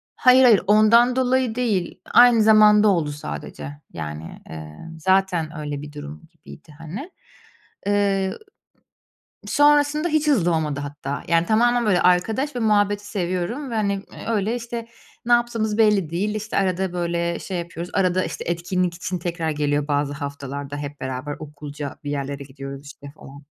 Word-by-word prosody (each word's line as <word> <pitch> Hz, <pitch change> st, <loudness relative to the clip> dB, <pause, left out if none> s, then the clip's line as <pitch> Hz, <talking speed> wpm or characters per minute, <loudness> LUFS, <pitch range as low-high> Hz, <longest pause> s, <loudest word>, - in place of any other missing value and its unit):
hayır, 255 Hz, +1 st, +6 dB
hayır, 225 Hz, -6 st, +6 dB
ondan 230 Hz, +4 st, +5 dB
dolayı 255 Hz, -2 st, +1 dB
değil, 215 Hz, -8 st, -1 dB
aynı 240 Hz, -2 st, +7 dB
zamanda 215 Hz, -1 st, +6 dB
oldu 165 Hz, -7 st, +2 dB
sadece. 75 Hz, -, -7 dB, 0.2 s
Yani, 75 Hz, +1 st, -7 dB
eee, 80 Hz, -1 st, -9 dB, 0.2 s
zaten 180 Hz, -3 st, +1 dB
öyle 145 Hz, -1 st, -4 dB
bir 150 Hz, 0 st, -10 dB
durum 75 Hz, -, -9 dB
gibiydi, 70 Hz, -, -15 dB
hani. 190 Hz, -, -7 dB, 0.8 s
Eee, 200 Hz, -2 st, +1 dB, 1.1 s
sonrasında 290 Hz, +4 st, +3 dB
hiç 310 Hz, 0 st, +1 dB
hızlı 180 Hz, -, +3 dB
olmadı 150 Hz, -3 st, -2 dB
hatta, 145 Hz, -1 st, -5 dB
yani, 170 Hz, 0 st, +3 dB
tamamen, 240 Hz, +2 st, +3 dB
böyle, 195 Hz, -4 st, +3 dB
arkadaş 220 Hz, +11 st, +2 dB
ve 245 Hz, -, -2 dB
muhabbeti 205 Hz, -2 st, +1 dB
seviyorum 195 Hz, +8 st, -3 dB
ve, -, -, -3 dB
hani, 205 Hz, -2 st, +1 dB
eee, 195 Hz, 0 st, -8 dB
öyle, 220 Hz, +1 st, 0 dB
işte, 235 Hz, -1 st, -6 dB, 0.4 s
ne 240 Hz, -, +3 dB
yaptığımız 230 Hz, -3 st, +1 dB
belli 210 Hz, -7 st, +3 dB
değil. 205 Hz, +5 st, -2 dB
İşte, 215 Hz, +1 st, -3 dB
arada, 190 Hz, -1 st, 0 dB
böyle, 170 Hz, -1 st, -1 dB
şey 190 Hz, -, -5 dB
yapıyoruz, 170 Hz, +1 st, -7 dB
arada, 185 Hz, -1 st, +2 dB
işte, -, -, -5 dB
etkinlik 175 Hz, +1 st, -1 dB
için 180 Hz, +1 st, -4 dB
tekrar 165 Hz, -1 st, -3 dB
geliyor 145 Hz, -1 st, -1 dB
bazı 145 Hz, -1 st, 0 dB
haftalarda, 140 Hz, 0 st, -6 dB
hep 145 Hz, 0 st, -7 dB
beraber 130 Hz, +3 st, -4 dB
okulca 145 Hz, -1 st, -7 dB
bir 145 Hz, -, -4 dB
yerlere 140 Hz, 0 st, -4 dB
gidiyoruz, 135 Hz, +1 st, -9 dB
işte, 140 Hz, 0 st, -11 dB
falan. 140 Hz, 0 st, -13 dB
180 Hz, 155 wpm, -22 LUFS, 145-215 Hz, 1.1 s, aynı